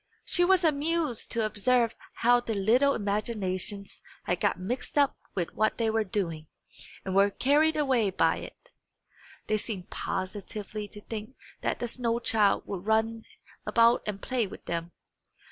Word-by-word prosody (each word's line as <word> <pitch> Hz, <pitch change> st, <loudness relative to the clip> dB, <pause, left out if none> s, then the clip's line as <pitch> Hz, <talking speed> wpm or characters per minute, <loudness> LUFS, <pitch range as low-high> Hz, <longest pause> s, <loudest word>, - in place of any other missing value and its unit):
She 355 Hz, -, +2 dB
was 370 Hz, 0 st, +4 dB
amused 310 Hz, -4 st, 0 dB
to 230 Hz, -2 st, 0 dB
observe 230 Hz, +2 st, +2 dB, 0.2 s
how 245 Hz, +1 st, +4 dB
their 230 Hz, -2 st, -3 dB
little 240 Hz, +8 st, +3 dB
imaginations 200 Hz, -2 st, -3 dB, 0.2 s
had 175 Hz, -, -1 dB
got -, -, +1 dB
mixed 245 Hz, +10 st, -4 dB
up 285 Hz, -2 st, +4 dB, 0.2 s
with 175 Hz, -3 st, -2 dB
what 215 Hz, 0 st, +1 dB
they 225 Hz, -2 st, +1 dB
were 220 Hz, 0 st, +2 dB
doing, 170 Hz, -6 st, -3 dB, 0.6 s
and 190 Hz, -, -2 dB
were 200 Hz, +1 st, +5 dB
carried 300 Hz, +8 st, +3 dB
away 260 Hz, -8 st, +2 dB
by 190 Hz, -, +2 dB
it. -, -, -11 dB, 0.7 s
They 215 Hz, -, +1 dB
seemed 205 Hz, -4 st, -4 dB
positively 205 Hz, +2 st, -4 dB
to 210 Hz, +1 st, -12 dB
think 220 Hz, +4 st, -7 dB, 0.3 s
that -, -, 0 dB
the 240 Hz, -, -3 dB
snow 235 Hz, -1 st, 0 dB
child 220 Hz, -4 st, +2 dB
would 190 Hz, -3 st, -5 dB
run 220 Hz, +1 st, +1 dB, 0.4 s
about 230 Hz, 0 st, +4 dB
and 205 Hz, -2 st, -3 dB
play 245 Hz, 0 st, -1 dB
with -, -, -11 dB
them. 170 Hz, 0 st, -3 dB
220 Hz, 155 wpm, -28 LUFS, 200-245 Hz, 0.7 s, were